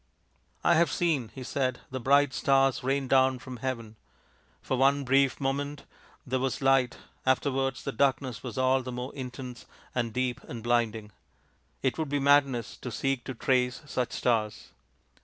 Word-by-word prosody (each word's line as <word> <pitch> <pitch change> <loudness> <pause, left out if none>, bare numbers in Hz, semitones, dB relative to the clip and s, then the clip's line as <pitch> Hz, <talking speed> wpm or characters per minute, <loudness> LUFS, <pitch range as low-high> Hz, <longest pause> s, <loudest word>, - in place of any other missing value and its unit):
" - - -39
I - - +5
have 170 +1 +4
seen/' 150 -10 0
he 130 - -9
said, 130 -1 -1
" - - -35
the 130 - -3
bright 140 +2 +4
stars 135 0 +2
rain 135 +1 0
down 130 0 +4
from 125 0 -9
heaven. 115 -4 -4 0.7
For - - -1
one 140 +2 +3
brief 135 0 +3
moment 140 +1 -2 0.4
there 130 0 -1
was 135 0 -1
light 135 -2 +3 0.3
afterwards 135 0 0
the - - -2
darkness 130 -2 0
was - - -7
all 130 0 +3
the 125 0 -6
more 125 +2 -5
intense 125 -2 -7 0.3
and 120 -2 -1
deep 125 +1 -1
and 115 -2 -7
blinding. 115 -3 0 0.7
It - - 0
would 155 -3 -1
be 145 - 0
madness 140 -4 +3
to 125 - -6
seek 135 +1 -1
to 130 - -5
trace 125 +2 +1
such 125 -4 -2
stars." 110 -3 0
130 Hz, 170 wpm, -28 LUFS, 125-135 Hz, 0.7 s, I